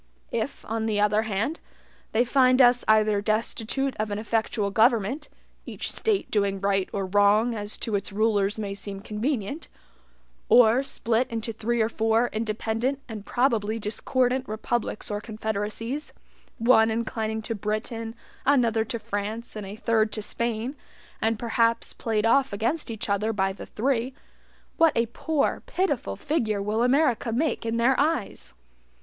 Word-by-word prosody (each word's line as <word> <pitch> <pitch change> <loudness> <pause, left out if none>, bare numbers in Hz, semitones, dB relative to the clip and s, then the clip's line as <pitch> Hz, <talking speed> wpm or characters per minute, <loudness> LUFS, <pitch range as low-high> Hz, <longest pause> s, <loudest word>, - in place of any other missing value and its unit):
If, - - -3
on 225 0 -1
the 210 -2 0
other 210 +1 +3
hand, 220 - -1 0.5
they 235 +3 +3
find 255 0 +4
us 245 -1 +6
either 215 -1 +4
destitute 225 +5 -1
of 215 0 -1
an 205 - -2
effectual 215 -1 -1
government 230 +6 +2 0.4
(each - - -2
State 425 -3 0
doing 200 -2 +1
right 195 -1 +1
or 195 -1 -2
wrong, 205 +4 +3
as 210 -1 -4
to 225 - -4
its 200 0 -1
rulers 205 -1 +1
may 205 -2 -3
seem 200 0 -6
convenient), 220 +6 -3 0.8
or 240 +1 +6
split 245 -3 0
into 225 0 -3
three 230 +2 -1
or - - +1
four 225 +1 +1
independent 225 +4 -1
and 215 -4 -8
probably 230 -4 +1
discordant 250 +4 -1
republics 215 0 -2
or 205 0 -2
confederacies, 220 +5 -4 0.4
one 225 -1 +5
inclining 220 -1 -2
to 230 - -3
Britain, 225 +2 -3 0.3
another 235 -5 +3
to 230 +1 -4
France, 215 +1 -4
and 210 -2 -6
a 200 - -7
third 220 -1 +1
to 215 - -3
Spain, 235 +4 -2 0.5
and 225 0 +1
perhaps 230 0 +1
played 220 -2 -1
off 270 +4 +3
against 230 +11 -1
each 220 -2 -4
other 210 +2 +1
by 195 -2 0
the - - -10
three, 255 +2 -1 0.6
what 325 -2 +5
a 230 - +3
poor, 290 +6 -1
pitiful 285 - -1
figure 220 - -1
will 210 +3 -1
America 250 -2 +2
make 245 -1 -1
in 225 +1 0
their 240 +3 +4
eyes! 295 - -1
225 Hz, 150 wpm, -26 LUFS, 210-245 Hz, 0.8 s, us